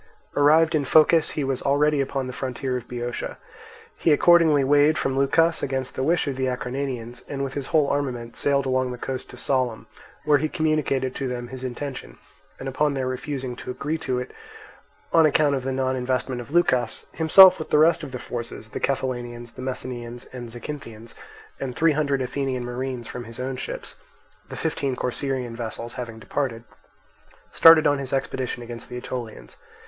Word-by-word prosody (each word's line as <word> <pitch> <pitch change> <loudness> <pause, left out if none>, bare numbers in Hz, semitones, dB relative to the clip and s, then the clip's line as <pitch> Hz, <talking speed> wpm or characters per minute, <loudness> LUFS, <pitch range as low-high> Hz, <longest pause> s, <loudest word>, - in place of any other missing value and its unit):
Arrived 160 +3 +5
in 155 -2 +2
Phocis 155 +3 +4
he 150 - +1
was 135 -1 -1
already 145 +1 +2
upon 135 0 -2
the 125 - -6
frontier 130 0 -3
of 125 -1 -5
Boeotia. 120 0 -4 0.6
He 165 - +2
accordingly 160 -2 +5
weighed 145 +3 +4
from 135 - -1
Leucas, 165 +5 +3
against 130 -1 -2
the - - -3
wish 165 +6 +2
of 135 -2 -2
the 130 0 0
Acarnanians, 125 -1 -4
and 140 -1 -3
with 135 -1 -4
his 140 -2 -4
whole 155 -2 +3
armament 125 -5 -2
sailed 140 -1 +1
along 130 -1 +1
the 125 - -6
coast 130 +1 -5
to - - -11
Sollium, 130 -4 -1 0.4
where 150 -1 +4
he 155 +2 -1
communicated 155 -6 0
to 135 - -3
them 120 -1 -5
his 130 0 -8
intention; 130 +2 -6 0.4
and 135 - -6
upon 140 +2 0
their 130 -1 -1
refusing 130 0 -4
to - - -8
agree 150 +5 -3
to 130 -5 -2
it 125 - -4 0.8
on 165 -2 +6
account 150 -1 +3
of 135 -2 -1
the 135 - -2
non 130 0 0
investment 125 0 -2
of 120 - -11
Leucas, 130 -8 +1
himself 180 +3 +8
with 155 - -6
the - - +3
rest 165 +2 +5
of 145 -4 -7
the 125 - -4
forces, 115 -2 -6
the - - -5
Cephallenians, 120 -3 -3
the - - -9
Messenians, 125 -2 -5
and 120 -2 -7
Zacynthians, 115 -2 -8 0.5
and 130 -2 -4
three 165 0 +4
hundred 140 -3 0
Athenian 130 -1 -2
marines 125 -1 -4
from 120 -1 -7
his 115 +1 -10
own 130 +1 -3
ships 125 - -6 0.5
(the - - -7
fifteen 140 -5 -1
Corcyraean 125 -1 -2
vessels 115 0 -5
having 120 -3 -6
departed), 115 -1 -3 0.9
started 165 -1 +8
on 145 -1 +3
his 135 -2 -5
expedition 130 -2 -2
against 120 0 -8
the 125 - -6
Aetolians. 115 - -7
130 Hz, 185 wpm, -24 LUFS, 125-145 Hz, 0.9 s, himself